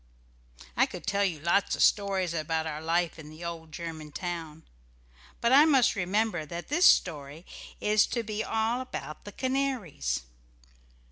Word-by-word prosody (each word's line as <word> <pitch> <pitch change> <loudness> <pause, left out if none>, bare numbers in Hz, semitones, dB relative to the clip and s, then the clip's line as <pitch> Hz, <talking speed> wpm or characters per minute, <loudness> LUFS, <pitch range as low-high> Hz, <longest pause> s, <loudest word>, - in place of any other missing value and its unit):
I - - +4
could - - -9
tell 200 -1 +1
you 175 -6 -1
lots 170 +6 +1
of - - +2
stories 195 -4 +2
about 160 0 -1
our 155 -1 -4
life 165 +1 0
in 150 -1 -10
the 155 +2 -9
old 165 -2 -6
German 160 -2 -7
town, 160 -2 -5 0.8
but 235 - +2
I 280 +3 +8
must 270 -6 +4
remember 200 -1 0
that 170 +3 -7
this 340 +5 +3
story 150 -1 +2 0.3
is 210 0 +3
to 235 - -2
be 215 0 -3
all 225 +3 0
about 205 -11 -7
the 205 - -7
canaries. 255 - -2
175 Hz, 155 wpm, -28 LUFS, 160-220 Hz, 0.8 s, I